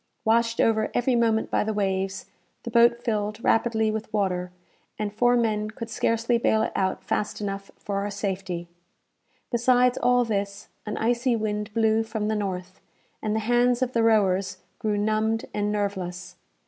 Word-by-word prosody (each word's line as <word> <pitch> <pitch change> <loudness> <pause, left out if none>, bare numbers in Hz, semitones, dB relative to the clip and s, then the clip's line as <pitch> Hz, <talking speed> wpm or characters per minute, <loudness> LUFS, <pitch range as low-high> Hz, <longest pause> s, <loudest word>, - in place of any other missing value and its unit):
Washed 230 +1 +2
over 220 -1 +2
every 245 +1 +2
moment 225 -2 +1
by - - +2
the 215 0 -2
waves, 190 -1 -1 0.4
the 235 - -5
boat 235 +1 +4
filled 210 -2 -1
rapidly 220 -1 +2
with 220 0 -5
water, 180 -4 -1 0.5
and 210 -1 -3
four 245 +3 +3
men 215 -2 0
could 225 +1 -8
scarcely 230 +1 +1
bale 220 -1 +2
it - - -2
out 190 -1 -1
fast 210 - -2
enough 195 -1 -4
for 200 -1 -4
our 200 +1 -1
safety. 190 -4 -4 0.8
Besides 245 +1 +3
all 245 0 +3
this, 200 -2 -3 0.2
an 210 - -3
icy 240 +2 +1
wind 210 -1 -2
blew 220 -1 +3
from 220 -1 -3
the 220 - 0
north, 185 -3 -4 0.4
and 215 0 -1
the 220 - 0
hands 245 +2 +2
of 255 0 -3
the 230 - +2
rowers 195 -4 +2 0.2
grew 215 -3 0
numbed 215 +2 0
and 205 0 0
nerveless. 190 -4 -3
215 Hz, 165 wpm, -25 LUFS, 200-230 Hz, 0.8 s, boat